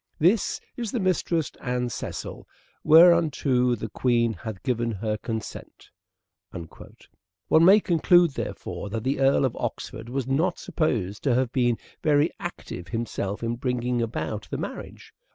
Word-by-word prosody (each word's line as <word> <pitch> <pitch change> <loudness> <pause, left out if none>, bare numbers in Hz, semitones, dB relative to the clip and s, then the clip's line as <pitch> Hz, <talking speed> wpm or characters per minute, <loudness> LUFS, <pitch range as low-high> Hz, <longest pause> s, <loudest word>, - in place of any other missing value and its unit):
This 185 +8 +2 0.2
is 235 -4 -4
the 245 - -1
mistress 175 -4 0
Anne 125 -1 -1
Cycille, - - -6 0.4
whereunto 155 -7 +5
the 110 - -5
Queen 115 +1 +1
hath 110 -3 -8
given 120 -3 -1
her 105 +1 -2
consent." 110 0 -7 0.6
One 90 - -3
may 195 +5 +8
conclude, 175 -2 +4
therefore, 105 - -5
that 110 +1 -4
the 135 +2 -1
Earl 135 0 +4
of 130 - -2
Oxford 110 +1 -5
was 130 0 -2
not 160 +7 +1
supposed 105 - -2
to 130 -4 +3
have 130 -1 +1
been 120 -3 +1 0.2
very 150 +1 +3
active 95 - -7
himself 105 0 -3
in 115 +1 -2
bringing'about 120 -5 -2
the - - -3
marriage. - - -8
125 Hz, 135 wpm, -25 LUFS, 115-155 Hz, 0.6 s, may